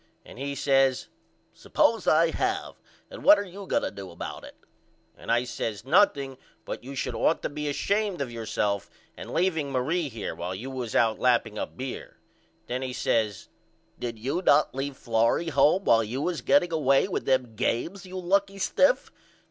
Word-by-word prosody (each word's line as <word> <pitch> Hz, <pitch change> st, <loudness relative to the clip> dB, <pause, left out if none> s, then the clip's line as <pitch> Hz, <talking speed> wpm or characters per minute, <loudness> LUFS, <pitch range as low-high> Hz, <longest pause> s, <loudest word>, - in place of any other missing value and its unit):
And -, -, -12 dB
he 140 Hz, +1 st, -3 dB
says 135 Hz, -2 st, +2 dB, 0.4 s
Suppose 230 Hz, -7 st, +1 dB
I 165 Hz, +1 st, +4 dB
have 385 Hz, 0 st, -2 dB, 0.4 s
and -, -, -9 dB
what 305 Hz, +1 st, +8 dB
are -, -, -2 dB
you 195 Hz, +1 st, -10 dB
going -, -, +1 dB
to -, -, -2 dB
do 95 Hz, -2 st, -9 dB
about 85 Hz, -, -7 dB
it? -, -, -12 dB, 0.6 s
And -, -, -6 dB
I 120 Hz, +1 st, +3 dB
says 115 Hz, -3 st, -4 dB
Nothing 140 Hz, -5 st, +2 dB, 0.3 s
but -, -, -6 dB
you 135 Hz, +2 st, -8 dB
should 125 Hz, -, -2 dB
ought 165 Hz, -, +1 dB
to -, -, -1 dB
be 150 Hz, 0 st, -4 dB
ashamed 200 Hz, +5 st, 0 dB
of 135 Hz, -3 st, -3 dB
yourself 105 Hz, -3 st, -2 dB, 0.3 s
and -, -, -9 dB
leaveing 160 Hz, -6 st, 0 dB
Marie 145 Hz, +5 st, 0 dB
here 115 Hz, -4 st, -5 dB
while 90 Hz, +2 st, -5 dB
you 125 Hz, +8 st, -6 dB
was 125 Hz, -4 st, -5 dB
out 110 Hz, -2 st, +3 dB
lapping 115 Hz, -4 st, +1 dB
up -, -, -5 dB
beer. 130 Hz, 0 st, -6 dB, 0.5 s
Then 125 Hz, +1 st, -3 dB
he 130 Hz, -1 st, -4 dB
says 110 Hz, -5 st, -1 dB, 0.5 s
Did 120 Hz, -2 st, -4 dB
you 135 Hz, +11 st, -2 dB
not 150 Hz, -4 st, +4 dB
leave 135 Hz, +1 st, -4 dB
Florrie 115 Hz, +8 st, +1 dB
home 165 Hz, +5 st, +3 dB
while 115 Hz, -8 st, +4 dB
you 115 Hz, +5 st, -4 dB
was 170 Hz, +3 st, -2 dB
getting 180 Hz, -3 st, +3 dB
away 140 Hz, 0 st, +3 dB
with 195 Hz, -, -3 dB
them 130 Hz, -3 st, +1 dB
games, 170 Hz, -, -1 dB
you 185 Hz, 0 st, -8 dB
lucky 195 Hz, +2 st, +1 dB
stiff? -, -, +2 dB
135 Hz, 180 wpm, -27 LUFS, 120-180 Hz, 0.6 s, what